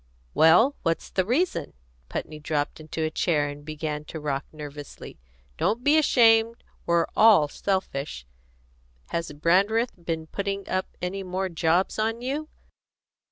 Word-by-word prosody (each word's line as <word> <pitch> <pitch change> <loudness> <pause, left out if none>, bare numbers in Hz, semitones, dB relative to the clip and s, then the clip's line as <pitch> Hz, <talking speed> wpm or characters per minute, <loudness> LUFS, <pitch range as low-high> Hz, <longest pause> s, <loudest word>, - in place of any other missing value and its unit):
"Well, 180 - +5
what's 165 -1 -2
the 185 -1 0
reason?" 250 - 0 0.4
Putney 155 -1 -5
dropped 150 -1 -2
into 155 +1 -4
a 155 - -1
chair 155 -3 +1
and 145 0 -8
began 150 0 -4
to 160 - -7
rock 140 -2 -3
nervously. 145 -2 -9 0.4
"Don't 225 +5 0
be 290 +3 +4
ashamed: 230 -6 +4 0.2
we're 170 -1 +3
all 210 -9 +6
selfish. 145 - -3 0.8
Has 170 -2 -3
Brandreth 195 +10 +2
been 165 -1 -3
putting 200 +3 -4
up 185 0 -1 0.2
any 190 +2 -2
more 190 0 -3
jobs 170 +4 +1
on 225 +1 0
you?" 295 +4 -3
170 Hz, 135 wpm, -26 LUFS, 155-215 Hz, 0.8 s, all